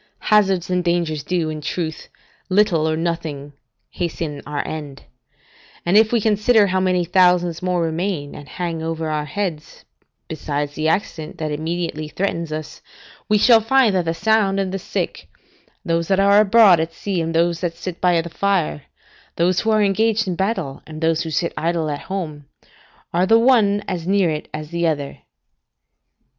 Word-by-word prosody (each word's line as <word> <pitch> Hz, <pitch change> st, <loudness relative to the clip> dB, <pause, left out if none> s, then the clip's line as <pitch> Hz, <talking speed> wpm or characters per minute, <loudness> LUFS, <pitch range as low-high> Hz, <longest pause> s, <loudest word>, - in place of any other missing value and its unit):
Hazards 190 Hz, -4 st, +3 dB
and 180 Hz, 0 st, +1 dB
dangers 170 Hz, -3 st, 0 dB
do, 165 Hz, -1 st, -1 dB
in 155 Hz, -1 st, -6 dB
truth, 160 Hz, +1 st, -4 dB, 0.4 s
little 185 Hz, -5 st, +2 dB
or 155 Hz, -, -1 dB
nothing 160 Hz, -4 st, -4 dB, 0.4 s
hasten 160 Hz, -4 st, -4 dB
our 150 Hz, -1 st, -3 dB
end; 145 Hz, -3 st, -7 dB, 0.8 s
and 175 Hz, +3 st, +2 dB
if 220 Hz, 0 st, +5 dB
we 235 Hz, -, +3 dB
consider 215 Hz, +1 st, +3 dB
how 190 Hz, -1 st, 0 dB
many 185 Hz, -1 st, +1 dB
thousands 180 Hz, -1 st, +3 dB
more 180 Hz, -2 st, 0 dB
remain 165 Hz, -2 st, -2 dB
and 145 Hz, -, -11 dB
hang 170 Hz, -3 st, -4 dB
over 160 Hz, -1 st, -3 dB
our 150 Hz, -1 st, -2 dB
heads, 160 Hz, -1 st, -5 dB, 0.4 s
besides 145 Hz, -2 st, -3 dB
the 155 Hz, +1 st, -2 dB
accident 160 Hz, -2 st, -2 dB
that 155 Hz, -1 st, -3 dB
immediately 160 Hz, 0 st, -3 dB
threatens 170 Hz, -1 st, -3 dB
us, 155 Hz, 0 st, -6 dB, 0.5 s
we 210 Hz, -, +4 dB
shall 225 Hz, +1 st, +6 dB
find 235 Hz, -1 st, +3 dB
that 180 Hz, -2 st, 0 dB
the 165 Hz, 0 st, -1 dB
sound 210 Hz, -1 st, +2 dB
and 190 Hz, -1 st, -1 dB
the 195 Hz, -, -3 dB
sick, -, -, -4 dB, 0.6 s
those 165 Hz, -1 st, 0 dB
that 190 Hz, -1 st, +2 dB
are 200 Hz, +1 st, +5 dB
abroad 210 Hz, -4 st, +6 dB
at 165 Hz, +1 st, -2 dB
sea, 190 Hz, -2 st, -2 dB
and 165 Hz, 0 st, -3 dB
those 170 Hz, 0 st, +1 dB
that 170 Hz, -2 st, -2 dB
sit 175 Hz, 0 st, -7 dB
by 180 Hz, -2 st, +3 dB
the 165 Hz, -, -8 dB
fire, 175 Hz, -4 st, -1 dB, 0.5 s
those 175 Hz, +2 st, +2 dB
who 225 Hz, -, -1 dB
are 215 Hz, -1 st, +3 dB
engaged 215 Hz, +2 st, +1 dB
in 180 Hz, -, -1 dB
battle, 190 Hz, -8 st, -2 dB
and 155 Hz, 0 st, -9 dB
those 160 Hz, 0 st, +1 dB
who 165 Hz, -, -4 dB
sit 160 Hz, +2 st, -1 dB
idle 165 Hz, -2 st, -1 dB
at 145 Hz, -, -4 dB
home, 155 Hz, -7 st, -5 dB, 0.7 s
are 180 Hz, +2 st, +2 dB
the 225 Hz, -, +6 dB
one 220 Hz, -4 st, +3 dB
as 180 Hz, -3 st, -4 dB
near 195 Hz, -3 st, +2 dB
it 150 Hz, 0 st, -4 dB
as 155 Hz, +1 st, -7 dB
the 170 Hz, 0 st, 0 dB
other. 145 Hz, -3 st, -3 dB
170 Hz, 175 wpm, -20 LUFS, 160-195 Hz, 0.8 s, shall